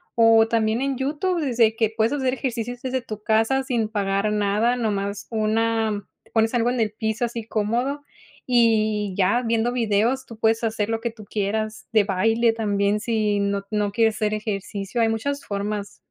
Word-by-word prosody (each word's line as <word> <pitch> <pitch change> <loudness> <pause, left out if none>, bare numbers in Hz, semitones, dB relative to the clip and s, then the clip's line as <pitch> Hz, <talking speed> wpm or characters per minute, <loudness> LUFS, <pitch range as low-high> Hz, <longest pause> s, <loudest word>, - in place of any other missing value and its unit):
o 225 -1 +6
también 225 +1 +1
en 275 -1 0
YouTube 310 +6 -1
desde 235 -6 +2
que 225 -1 +1
puedes 225 +4 +2
hacer 265 -3 0
ejercicios 245 -2 -4
desde 260 0 -1
tu 215 -3 -8
casa 225 +5 +2
sin 235 -4 -1
pagar 200 0 0
nada 210 +4 +1
no 225 -3 0
más 200 0 -3
una, 220 -1 0 0.3
pones 225 +1 +2
algo 240 0 +2
en 250 - -2
el 215 - 0
piso 220 +2 -1
así 230 -2 -5
cómodo 240 +7 -1 0.4
y 215 -4 +2
ya 200 +6 +3
viendo 230 +1 +1
videos, 230 +2 +1
tú 230 - -10
puedes 225 +1 +2
hacer 220 -1 -1
lo 225 0 -1
que 235 - -1
tú 215 -2 -13
quieras 215 +1 -3
de 215 - +5
baile 225 +4 +2
también. 205 -2 0
Si 215 -2 0
no, 200 0 -1
no 210 -1 0
quieres 225 0 +2
hacer 215 0 0
ejercicio, 205 0 -3
hay 225 - +3
muchas 280 +6 -2
formas. 205 0 -4
225 Hz, 180 wpm, -23 LUFS, 210-235 Hz, 0.4 s, o